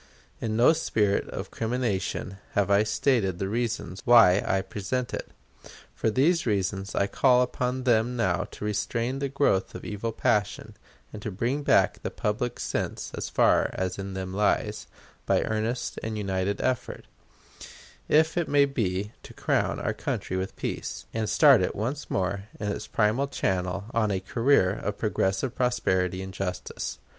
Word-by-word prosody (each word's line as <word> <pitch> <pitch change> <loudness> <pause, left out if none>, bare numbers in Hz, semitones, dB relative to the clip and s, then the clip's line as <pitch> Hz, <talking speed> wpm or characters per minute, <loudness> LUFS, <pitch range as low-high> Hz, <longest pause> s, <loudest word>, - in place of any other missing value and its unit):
In 110 -1 -2
no 125 +7 +6
spirit 105 -10 0
of - - -6
crimination 110 -5 -2 0.2
have 100 -1 +1
I 100 +1 +5
stated 110 -4 +1
the 95 - -2
reasons 110 -4 -2
why 115 -7 +7
I 95 0 +1
present 105 +6 -3
it. - - -4 0.6
For - - 0
these 150 +7 +2
reasons 100 -1 -1
I 100 - +2
call 125 +4 +4
upon 125 +1 -2
them 120 0 +2
now 95 -4 0
to - - -7
restrain 115 +5 -1
the 140 0 -1
growth 135 -8 +1
of - - -8
evil 105 +2 -3
passion, 105 -1 0 0.4
and 105 - -7
to 105 - -4
bring 120 +9 -1
back - - +3
the - - -3
public 120 +3 -2
sense - - -3
as - - -4
far - - +3
as 95 0 -3
in 95 0 -5
them 95 -1 -4
lies, 105 +1 0 0.4
by - - +3
earnest 110 +3 -2
and 110 -1 -4
united 100 0 -1
effort, 130 -1 -2 1.0
if 160 +2 +3
it 175 - 0
may 145 -1 +5
be, 105 -7 -2
to - - -13
crown - - 0
our - - -1
country 95 - -3
with 95 +1 -3
peace, - - -4
and 110 -1 -1
start - - +6
it - - -1
once 130 +8 -3
more 95 +1 -1
in 105 - -2
its 100 - -4
primal 115 +6 +1
channel 95 -5 -1
on 110 -2 +2
a 95 -2 0
career 115 0 +3
of - - -4
progressive 95 +7 0
prosperity 95 -8 0
and 95 0 -8
justice. 90 -1 -4
105 Hz, 165 wpm, -27 LUFS, 95-125 Hz, 1.0 s, why